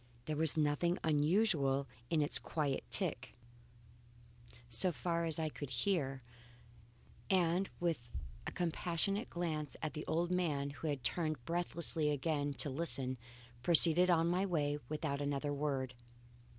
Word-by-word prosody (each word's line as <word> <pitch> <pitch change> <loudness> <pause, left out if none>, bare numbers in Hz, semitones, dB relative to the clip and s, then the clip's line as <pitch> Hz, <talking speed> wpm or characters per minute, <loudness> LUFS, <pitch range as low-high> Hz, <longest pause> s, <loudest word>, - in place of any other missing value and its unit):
There 155 - -2
was 160 +1 +1
nothing 155 +4 +1
unusual 150 -3 +2 0.2
in 155 -3 +2
its 145 - +4
quiet 145 -4 -2
tick, - - -2 1.3
so 120 +10 +5
far 170 0 -1
as 160 -2 -1
I 160 -1 -1
could 145 -2 -7
hear, 135 -1 -1 1.1
and 185 0 +2
with 165 -9 -2 0.4
a - - -3
compassionate 180 +5 -1
glance 155 -4 -3
at 155 -3 -4
the 150 - -6
old 170 +3 0
man 150 -6 0
who 145 +3 -6
had 140 -4 -2
turned 155 -7 -2
breathlessly 170 -2 +1
again 145 0 -1
to 145 - +2
listen, 130 -4 +1 0.4
proceeded 170 +4 +6
on 165 -2 +4
my 180 +2 +1
way 150 -6 0
without 150 -2 -2
another 145 0 -1
word. 140 -3 -2
155 Hz, 135 wpm, -35 LUFS, 145-170 Hz, 1.3 s, proceeded